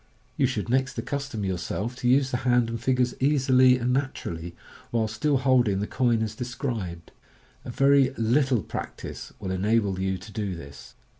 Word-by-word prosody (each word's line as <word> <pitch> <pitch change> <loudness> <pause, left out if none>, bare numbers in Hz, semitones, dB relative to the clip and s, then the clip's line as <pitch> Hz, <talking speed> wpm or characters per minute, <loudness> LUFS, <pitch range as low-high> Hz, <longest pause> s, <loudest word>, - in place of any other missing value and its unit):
You 135 - +2
should 115 -5 -3
next 130 +2 0
accustom 140 -7 -3
yourself 95 +5 -3
to 125 -2 0
use 130 +1 +3
the 125 - +1
hand 120 -2 +2
and 115 -1 -4
fingers 125 -1 +1
easily 130 -2 +4
and 125 0 0
naturally, 85 -11 -3 0.3
while 115 -2 0
still 135 +7 0
holding 125 -6 +3
the 105 - -1
coin 120 -1 +1
as 110 -1 -3
described. 115 - -5 0.5
A - - -6
very 135 +1 +4
little 120 0 +2
practice - - -7
will 95 - -4
enable 100 0 +1
you 95 0 -1
to 100 +4 -12
do 105 -4 -3
this. 70 -5 -11
120 Hz, 165 wpm, -26 LUFS, 100-130 Hz, 0.5 s, easily